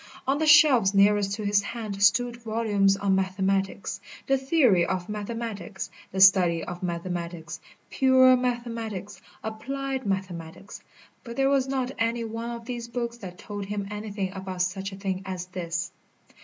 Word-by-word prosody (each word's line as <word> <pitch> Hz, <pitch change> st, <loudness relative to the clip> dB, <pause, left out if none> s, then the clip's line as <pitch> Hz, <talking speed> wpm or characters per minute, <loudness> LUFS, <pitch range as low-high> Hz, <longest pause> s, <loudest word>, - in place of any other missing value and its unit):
On 275 Hz, +2 st, +1 dB
the 315 Hz, -, +1 dB
shelves 270 Hz, -10 st, +6 dB
nearest 200 Hz, 0 st, +4 dB
to 210 Hz, 0 st, -4 dB
his 200 Hz, 0 st, +3 dB
hand 210 Hz, -2 st, -5 dB
stood 235 Hz, +4 st, +4 dB
volumes 215 Hz, -4 st, +1 dB
on 200 Hz, -1 st, +1 dB
mathematics, 190 Hz, 0 st, -1 dB, 0.2 s
the 270 Hz, -, +3 dB
theory 265 Hz, -, +3 dB
of 180 Hz, 0 st, -2 dB
mathematics, 210 Hz, -3 st, -5 dB, 0.2 s
the 190 Hz, -, -3 dB
study 180 Hz, -4 st, +6 dB
of 175 Hz, 0 st, -7 dB
mathematics, 170 Hz, -2 st, -4 dB, 0.3 s
pure 260 Hz, -1 st, +6 dB
mathematics, 230 Hz, -6 st, -3 dB, 0.2 s
applied 265 Hz, +3 st, -4 dB
mathematics. 190 Hz, -1 st, -5 dB, 0.4 s
But 235 Hz, -1 st, -8 dB
there 270 Hz, +1 st, +2 dB
was 270 Hz, -2 st, +2 dB
not 265 Hz, -1 st, -1 dB
any 230 Hz, +1 st, 0 dB
one 230 Hz, +1 st, -5 dB
of 235 Hz, -1 st, -7 dB
these 240 Hz, -1 st, -5 dB
books 235 Hz, 0 st, -4 dB
that 185 Hz, -6 st, -9 dB
told 205 Hz, 0 st, -6 dB
him 200 Hz, 0 st, -4 dB
anything 205 Hz, -2 st, -4 dB
about 190 Hz, -2 st, -3 dB
such 190 Hz, +2 st, -3 dB
a -, -, -8 dB
thing 190 Hz, -1 st, -3 dB
as 185 Hz, -2 st, -5 dB
this. 175 Hz, -1 st, -4 dB
205 Hz, 155 wpm, -26 LUFS, 190-235 Hz, 0.4 s, shelves